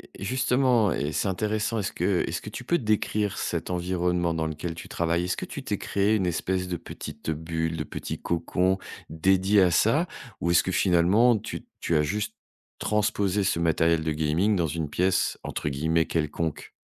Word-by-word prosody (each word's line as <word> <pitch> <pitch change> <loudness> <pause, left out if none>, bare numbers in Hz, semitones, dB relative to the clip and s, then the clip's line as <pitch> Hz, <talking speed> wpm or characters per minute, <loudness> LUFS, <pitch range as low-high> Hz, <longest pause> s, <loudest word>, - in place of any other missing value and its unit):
et - - -8
justement, 125 -3 +2
et 70 +2 -2
c'est 100 - 0
intéressant. 110 +3 -1
Est-ce 100 - -2
que 95 -3 +1
est-ce 85 - -3
que 105 - -7
tu 120 - -7
peux 170 +7 +2
décrire 105 -3 0
cet 85 -1 -2
environnement 90 -1 0
dans 80 -1 -1
lequel 80 +2 -4
tu - - -9
travailles? 85 +1 0
Est-ce 90 - -1
que - - -4
tu - - -7
t'es - - -2
créé 100 +2 +1
une 95 -4 +1
espèce 90 +2 -1
de 90 -1 -2
petite, 75 0 -8
heu, - - +2
bulle, 80 +1 -3
de 75 - -2
petit - - -6
cocon, 90 +3 +1 0.3
dédié 95 +5 +3
à 90 -2 +4
ça? 145 - +3 0.3
Ou 85 - 0
est-ce 85 - +5
que, 95 - -2
finalement, 100 +7 +4
tu 105 - -7
tu 85 - 0
as 75 - +4
juste 105 +6 -2 0.4
transposé 105 -2 +1
ce 90 -3 +1
matériel 80 0 +2
de 80 - 0
gaming 80 +7 +1
dans 85 -3 +1
une 75 0 -3
pièce, 90 +4 +1
entre - - -3
guillemets, 80 +4 +1
«quelconque»? 80 0 -2
90 Hz, 190 wpm, -26 LUFS, 80-105 Hz, 0.4 s, est-ce